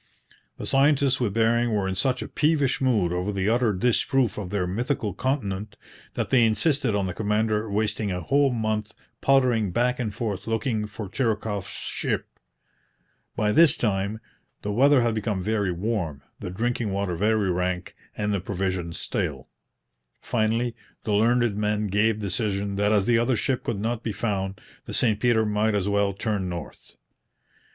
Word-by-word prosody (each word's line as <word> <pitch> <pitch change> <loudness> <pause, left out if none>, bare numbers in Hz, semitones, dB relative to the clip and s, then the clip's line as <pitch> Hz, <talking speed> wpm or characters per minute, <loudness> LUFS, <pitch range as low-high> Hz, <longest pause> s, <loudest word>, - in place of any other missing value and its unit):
The - - -6
scientists 140 -1 +3
with 110 -5 -1
Bering 115 0 +2
were 100 -2 0
in 95 - -1
such 130 +5 0
a - - -6
peevish 150 -4 +1
mood 105 -10 +2
over 90 +3 -1
the 100 -1 -1
utter 120 -1 +3
disproof 120 +3 +1
of 95 -4 -5
their 100 -2 -1
mythical 110 +3 -2
continent 105 -7 -2 0.4
that - - -2
they 130 -3 +5
insisted 115 +1 +2
on 100 -1 +1
the 90 - -3
commander 110 +1 0
wasting 105 0 0
a 90 - -2
whole 140 - +2
month 110 -2 -2 0.3
pottering 125 -6 +3
back 125 +6 +1
and 115 -4 -1
forth 105 -2 -4
looking 110 -1 -1
for 105 0 -7
Chirikoff's 105 -3 -1
ship. - - -3 1.1
By 105 -1 +1
this 165 +5 +5
time 100 -1 -1 0.4
the 105 - -2
weather 135 +5 +5
had 120 -1 +1
become 105 -3 -2
very 105 -2 0
warm, 85 -6 -2 0.2
the - - -5
drinking 115 +2 -1
water 95 -2 -1
very 105 +1 +2
rank, 90 0 -2 0.2
and 105 0 0
the 100 - +1
provisions 95 -3 -3
stale. - - -3 0.7
Finally, 115 +1 0 0.3
the 105 - -1
learned 115 +1 +3
men 105 0 0
gave 105 +2 +2
decision 100 -2 -2
that 105 +1 +2
as 105 -2 +3
the 115 0 +3
other 120 +2 +2
ship 125 +4 -1
could 115 -4 -2
not 115 +2 -2
be 115 - -3
found 100 -3 -2 0.3
the - - -5
St 110 -4 +2
Peter 115 -2 +3
might 105 +1 +1
as 100 -1 0
well 100 -1 +2
turn 100 -2 -2
north. 85 -1 -8
110 Hz, 165 wpm, -25 LUFS, 100-120 Hz, 1.1 s, they